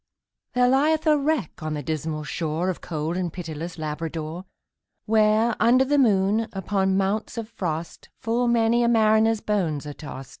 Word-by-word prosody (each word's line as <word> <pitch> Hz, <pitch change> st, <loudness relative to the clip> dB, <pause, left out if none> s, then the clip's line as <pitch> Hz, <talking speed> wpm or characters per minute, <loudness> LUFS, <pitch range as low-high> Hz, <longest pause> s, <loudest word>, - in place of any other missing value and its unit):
There 250 Hz, 0 st, +3 dB
lieth 300 Hz, +5 st, +2 dB
a 305 Hz, -1 st, +5 dB
wreck 290 Hz, -, -1 dB
on 155 Hz, 0 st, -3 dB
the 145 Hz, -, -5 dB
dismal 155 Hz, +1 st, -3 dB
shore 165 Hz, +3 st, -2 dB
Of 180 Hz, -, -9 dB
cold 160 Hz, 0 st, -3 dB
and 180 Hz, -2 st, -2 dB
pitiless 165 Hz, -1 st, -6 dB
Labrador; 160 Hz, +2 st, -5 dB, 0.6 s
Where, 220 Hz, +1 st, +3 dB
under 250 Hz, +4 st, +4 dB
the 290 Hz, +2 st, +2 dB
moon, 215 Hz, -2 st, +3 dB
upon 190 Hz, 0 st, 0 dB
mounts 200 Hz, +4 st, -1 dB
of 225 Hz, -2 st, -4 dB
frost, 165 Hz, -4 st, -5 dB
Full 235 Hz, +2 st, 0 dB
many 235 Hz, 0 st, +3 dB
a 235 Hz, -, +3 dB
mariner's 220 Hz, -1 st, +3 dB
bones 170 Hz, -9 st, -1 dB
are 145 Hz, -, -6 dB
tost. 135 Hz, -4 st, -9 dB
195 Hz, 160 wpm, -24 LUFS, 160-230 Hz, 0.6 s, a